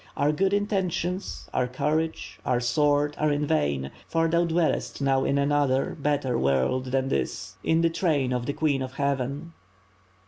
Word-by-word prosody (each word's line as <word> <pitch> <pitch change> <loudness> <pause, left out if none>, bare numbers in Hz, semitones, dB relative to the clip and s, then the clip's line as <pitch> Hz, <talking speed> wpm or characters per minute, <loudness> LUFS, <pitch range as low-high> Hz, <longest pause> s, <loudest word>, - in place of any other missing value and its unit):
Our 145 +1 +3
good 190 +5 +1
intentions, 190 -2 -1
our 125 -1 +1
courage, 155 +5 -2
our 120 - +1
sword 145 +4 +2
are 150 0 +2
in 145 +1 0
vain, 70 - 0 0.2
for 165 0 +1
thou 170 +1 +2
dwellest 165 -1 0
now 135 -1 +2
in 140 - +1
another, 140 -2 +1
better 140 -4 0
world 70 - +1
than 130 +1 0
this; 90 +6 -2
in 160 0 +2
the 165 - +3
train 145 -7 +1
of 125 -1 -2
the 145 - -1
Queen 145 -4 0
of 130 -1 -5
Heaven." 140 +3 -2
145 Hz, 165 wpm, -26 LUFS, 130-160 Hz, 0.2 s, Our